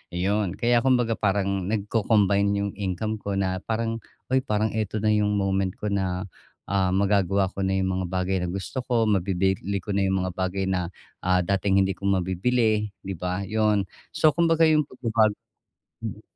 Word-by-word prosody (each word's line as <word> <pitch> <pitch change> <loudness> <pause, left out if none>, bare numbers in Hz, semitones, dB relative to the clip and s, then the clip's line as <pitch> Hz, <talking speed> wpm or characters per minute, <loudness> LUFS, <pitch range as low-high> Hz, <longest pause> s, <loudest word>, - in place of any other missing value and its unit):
iyon. 95 +1 0
Kaya 120 0 +3
kumbaga 125 -3 +2
parang 100 -3 0
nagco-combine 105 -1 +2 0.2
yung 100 - -3
income 105 +2 -3
ko 100 -1 -3
na 95 -1 0
parang, 115 +1 -2 0.3
"Uy, 130 - +4
parang 110 -3 0
eto 110 -1 -2
na 110 - +3
yung 105 -1 +2
moment 95 -1 0
ko 105 - -4
na, 95 -2 -1 0.5
ah, 95 -2 +2
magagawa 100 -1 +2
ko - - -9
na 95 0 +1
yung 95 0 0
mga 95 - -2
bagay 95 +1 0
na - - -1
gusto 95 +8 -4
ko, 120 -2 +1
mabibili 95 0 0
ko 105 - -4
na 100 -1 +1
yung 95 -1 +1
mga 95 - -2
bagay 95 +1 -1
na, 90 -2 0 0.3
ah, 90 0 +2
dating 95 +1 +2
hindi 95 - 0
ko 100 +1 -4
mabibili," 105 +4 +1
'di 95 - -4
ba? 90 +2 -2
'Yon, 105 0 +1 0.3
so 155 - +5
kumbaga 165 0 +3
yung 155 -1 +4
pagbabago 115 -4 +1 0.7
M - - -7
100 Hz, 175 wpm, -25 LUFS, 95-110 Hz, 0.7 s, so